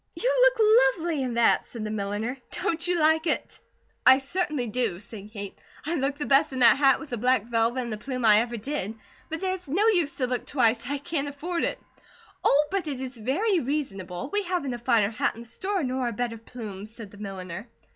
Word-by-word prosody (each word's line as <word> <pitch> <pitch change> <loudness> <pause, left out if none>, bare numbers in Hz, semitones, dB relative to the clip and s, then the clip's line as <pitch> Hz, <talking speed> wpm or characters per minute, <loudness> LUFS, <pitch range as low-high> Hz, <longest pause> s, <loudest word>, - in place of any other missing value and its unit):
"You - - +1
look - - +5
lovely 325 -3 -2
in 250 -3 -2
that," 235 -1 +4
said 230 -3 -7
the 215 - -3
milliner. 210 +4 -2
"Don't 335 +1 -2
you 355 0 +1
like 315 +1 +3
it?" 305 - -1 0.4
"I 260 - +8
certainly 285 -1 -2
do," 225 -5 -1
said 205 0 -10
Kate. 200 -3 -7 0.3
"I 320 - -1
look 280 -2 -1
the 295 - -3
best 280 +2 +4
in - - -4
that 240 - +7
hat, 275 -2 +4
with 310 - -10
the 240 - -3
black 250 -1 +3
velvet 235 +2 +1
and 235 -3 -4
the 210 - -6
plume, 255 0 -3
I 210 -1 +8
ever 235 +1 -2
did, 225 -3 -3 0.3
but 320 +2 -4
there's 375 -3 -3
no 370 +10 +2
use 345 -9 +1
to 260 - +1
look 250 0 -3
twice, 240 -2 +1
I 285 - 0
can't 290 -1 -2
afford 335 +5 -2
it." - - -2 0.6
"Oh, 295 +2 +4
but 390 -4 -1
it 275 -4 -3
is 260 -1 -5
very 335 - +1
reasonable! 255 - -4
We 415 - +2
haven't 350 -9 -2
a 240 - -5
finer 230 -4 +2
hat 220 - 0
in 230 - -9
the 235 - -11
store, 380 - -2
nor 255 -1 -1
a 235 - -2
better 230 +1 -3
plume," 215 -4 -8
said 220 -2 -10
the 205 - -14
milliner. 190 0 -7
260 Hz, 220 wpm, -26 LUFS, 225-315 Hz, 0.6 s, I